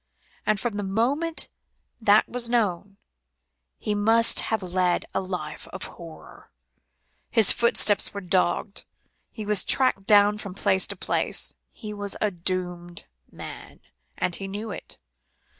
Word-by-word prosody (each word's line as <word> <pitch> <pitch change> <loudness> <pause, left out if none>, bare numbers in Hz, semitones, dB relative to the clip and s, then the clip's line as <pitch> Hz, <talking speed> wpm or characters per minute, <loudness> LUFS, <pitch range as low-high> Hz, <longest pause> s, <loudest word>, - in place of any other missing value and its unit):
And 215 -1 +2
from 230 -2 -2
the - - -1
moment 255 +12 +1 0.5
that 210 0 +5
was 240 -1 -2
known, 200 -4 0 0.8
he 210 - -2
must 225 +3 +4
have 220 -3 -1
led 180 -1 +1
a - - 0
life 175 -5 -5
of 185 - -6
horror. 165 -2 -11 0.8
His 225 -4 +6
footsteps 215 -3 +2
were 200 - -5
dogged; 185 +2 0 0.5
he 215 - -7
was 210 -2 +3
tracked 225 -7 +2
down 205 0 +5
from 200 -3 -7
place 190 -1 +2
to - - -3
place; - - -2 0.2
he 210 -2 -7
was 205 -1 -4
a 210 - +1
doomed 175 -1 -4 0.3
man, - - -10 0.4
and 180 - 0
he 195 - -6
knew 205 +3 -5
it. - - -8
205 Hz, 140 wpm, -25 LUFS, 185-220 Hz, 0.8 s, His